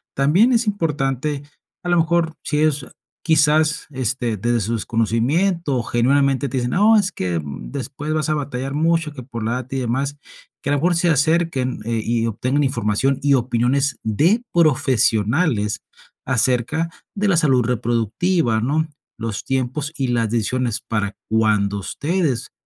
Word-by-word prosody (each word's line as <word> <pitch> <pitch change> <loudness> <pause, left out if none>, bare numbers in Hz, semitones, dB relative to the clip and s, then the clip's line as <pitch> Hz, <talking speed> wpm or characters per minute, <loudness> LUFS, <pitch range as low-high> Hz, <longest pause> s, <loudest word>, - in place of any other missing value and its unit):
También 165 - +4
es 235 0 +2
importante, 145 - -1 0.4
a 175 - -3
lo 175 - +3
mejor, 165 0 +1
si 150 - -1
ellos 145 -4 +1 0.4
quizás, 155 -1 +3
este, 125 -3 -1
desde 120 +3 0
su 115 +4 -2
desconocimiento, 125 - 0
genuinamente 135 +3 +1
te 130 - -3
dicen, 120 -1 -1
no, 215 +4 +5
es 195 -2 +1
que 90 - -2
después 105 - -6
vas 155 -2 0
a 155 - +2
batallar 135 -1 -4
mucho, 160 0 +1
que 130 - -8
por 115 -3 -6
la 110 - -1
data 130 +1 -4
y - - 0
demás, 135 +4 -2 0.5
que - - -2
a - - +3
lo 145 - +1
mejor 175 +4 +2
se 170 +1 +2
acerquen, 155 -3 +1
eh, 115 -1 -1
y 115 0 0
obtengan 130 +6 0
información 130 +1 0
y 140 -1 +4
opiniones 130 +3 0
de 165 - +2
profesionales 125 - +2 0.4
acerca 130 +6 +1 0.3
de 205 0 0
la 190 -4 +3
salud 135 -6 +3
reproductiva, 120 - 0
¿no?, 155 +6 0 0.3
los 110 -2 -4
tiempos 135 +3 -2
y 135 - 0
las 115 -2 +1
decisiones 120 0 -1
para 105 -3 -2
cuando 105 -2 +2
ustedes, 150 - -2
135 Hz, 155 wpm, -20 LUFS, 115-155 Hz, 0.5 s, no